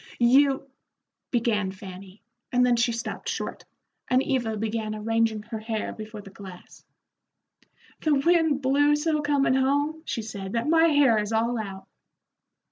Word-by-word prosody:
"You 270 +3 +4 0.3
" - - -60
began 225 -5 +1
Fanny, 190 +1 -11 0.3
and 250 0 +3
then 245 -1 +3
she 235 0 +2
stopped 230 0 -5
short, - - -5 0.4
and 255 +1 +3
Eva 235 -6 -1
began 215 0 -3
arranging 225 0 0
her 220 0 -6
hair 220 0 -3
before 215 -1 -8
the 195 -1 -13
glass. 190 -2 -12 1.2
"The 310 -2 +2
wind 315 -1 +2
blew 290 +3 +3
so 305 0 0
comin' 285 -3 +2
home," 285 +4 +1
she 225 - -3
said, 195 -2 -7
"that 230 +4 -1
my 325 +1 +5
hair 285 -8 +4
is 210 +1 -3
all 230 +2 +1
out." 195 -3 -7
235 Hz, 150 wpm, -26 LUFS, 215-280 Hz, 1.2 s, my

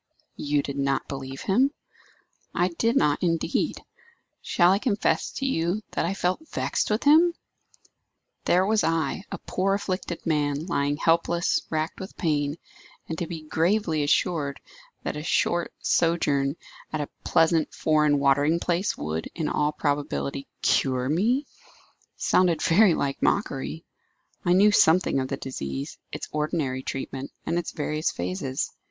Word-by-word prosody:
"You 145 -1 0
did 140 0 -4
not 140 0 0
believe 135 -1 -6
him?" 245 +8 +3 0.9
"I 175 +2 +2
did 230 +8 0
not, 150 - +2
indeed. 165 -2 0 0.6
Shall 175 0 +3
I 195 - +3
confess 220 -3 +1
to 270 - -3
you 185 -3 0
that - - -1
I 190 - -2
felt 185 - -1
vexed - - -1
with 215 +1 0
him? 330 +4 +6 1.1
There 180 +2 +4
was 215 +1 +2
I, 165 +3 0
a - - -3
poor 195 +1 0
afflicted 185 -3 -4
man, 150 -1 0
lying 145 -5 0
helpless, 170 +2 +2
racked 155 0 -2
with 190 - -8
pain; 145 -3 0 0.5
and 165 - -3
to 170 - -2
be 160 -2 -6
gravely 165 +1 +1
assured 145 -1 +1 0.4
that - - -3
a 150 - -4
short 170 +2 +1
sojourn 145 -4 +1 0.4
at 155 - -2
a 145 - -4
pleasant 165 -1 +3
foreign 150 -2 +2
watering 145 +4 +3
place 175 +3 0
would, 80 +2 -3
in 160 -3 -2
all 150 0 +1
probability, 145 -2 -2 0.2
cure 130 -1 +2
me, 230 - +2 0.7
sounded 180 -3 +3
very 185 0 +5
like 140 -1 -2
mockery. 70 +4 -1 0.6
I 175 - +4
knew 205 +3 +6
something 170 -6 +4
of 130 - -1
the 140 - -3
disease, 70 - -5
its - - -5
ordinary 150 -4 -1
treatment, 135 0 -5 0.2
and 170 - 0
its 175 - -4
various 155 +1 -1
phases. 95 +10 -3
160 Hz, 145 wpm, -26 LUFS, 140-180 Hz, 1.1 s, him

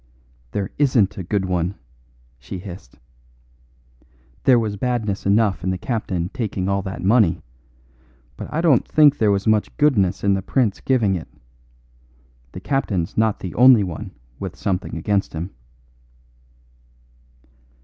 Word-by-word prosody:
"There 100 +7 -3
isn't 110 -8 +2
a - - -4
good 95 +2 -1
one," 90 +1 -1 0.6
she 70 +8 -7
hissed. 90 -9 -10 1.5
"There 130 -2 +6
was 110 -3 -1
badness 110 -4 -2
enough 100 -1 +2
in 95 - -1
the 95 - -1
captain 95 -6 -3
taking 100 -6 -3
all 100 0 0
that 95 -1 -6
money, 105 -3 +3 0.9
but - - -8
I 155 - -1
don't 155 -8 +3
think 150 -2 +4
there 110 - +3
was 100 -1 +1
much 110 -1 +1
goodness 110 -12 +2
in 100 0 +3
the 95 - 0
prince 110 0 0
giving 115 -7 +2
it. 85 -4 -4 1.2
The - - -8
captain's 100 - -1
not 110 -1 +1
the 90 - -5
only 125 -3 +6
one 90 -4 -6 0.3
with - - -6
something 95 -1 -3
against 100 -2 -1
him." 85 +4 -5
100 Hz, 140 wpm, -21 LUFS, 95-115 Hz, 1.5 s, There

